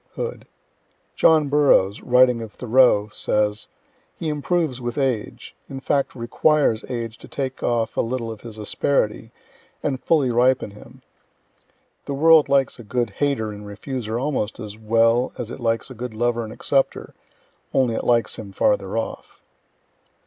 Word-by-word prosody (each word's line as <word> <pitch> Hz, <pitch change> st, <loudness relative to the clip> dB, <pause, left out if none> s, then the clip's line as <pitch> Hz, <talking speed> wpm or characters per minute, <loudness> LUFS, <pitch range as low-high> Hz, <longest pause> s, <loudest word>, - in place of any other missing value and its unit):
Hood. 475 Hz, +1 st, -5 dB, 0.7 s
John 155 Hz, -2 st, +4 dB
Burroughs, 135 Hz, -9 st, +3 dB
writing 125 Hz, -1 st, +4 dB
of 110 Hz, -2 st, -8 dB
Thoreau, 120 Hz, -4 st, +3 dB
says: 105 Hz, 0 st, 0 dB, 0.5 s
"He 160 Hz, -, -3 dB
improves 150 Hz, -3 st, -1 dB
with 120 Hz, +1 st, -4 dB
age 130 Hz, -6 st, -2 dB
in 135 Hz, -, -6 dB
fact 140 Hz, 0 st, -1 dB
requires 120 Hz, 0 st, +1 dB
age 115 Hz, -2 st, -5 dB
to -, -, -12 dB
take 135 Hz, -2 st, -4 dB
off 115 Hz, -2 st, 0 dB
a -, -, +2 dB
little 115 Hz, -1 st, -3 dB
of 110 Hz, -, -9 dB
his 115 Hz, -2 st, -9 dB
asperity, 110 Hz, +1 st, -1 dB, 0.5 s
and 135 Hz, -3 st, -2 dB
fully 145 Hz, -6 st, +2 dB
ripen 125 Hz, -2 st, +2 dB
him. 105 Hz, -, -15 dB, 1.0 s
The 140 Hz, -, -3 dB
world 160 Hz, +1 st, +5 dB
likes 135 Hz, -2 st, +2 dB
a -, -, -9 dB
good 120 Hz, 0 st, -2 dB
hater 130 Hz, -3 st, -1 dB
and 105 Hz, 0 st, -9 dB
refuser 110 Hz, +2 st, -5 dB
almost 130 Hz, -6 st, -2 dB
as 105 Hz, -2 st, -7 dB
well 115 Hz, +3 st, +2 dB
as 120 Hz, -1 st, -5 dB
it -, -, -7 dB
likes 115 Hz, +1 st, -1 dB
a -, -, -6 dB
good 120 Hz, -1 st, -7 dB
lover 120 Hz, +1 st, 0 dB
and 110 Hz, -, -7 dB
accepter 135 Hz, +4 st, -1 dB, 0.6 s
only 130 Hz, -3 st, +2 dB
it -, -, -3 dB
likes 120 Hz, -1 st, +1 dB
him 105 Hz, -3 st, -8 dB
farther 260 Hz, -, +1 dB
off." 115 Hz, -, -6 dB
120 Hz, 155 wpm, -22 LUFS, 110-135 Hz, 1.0 s, world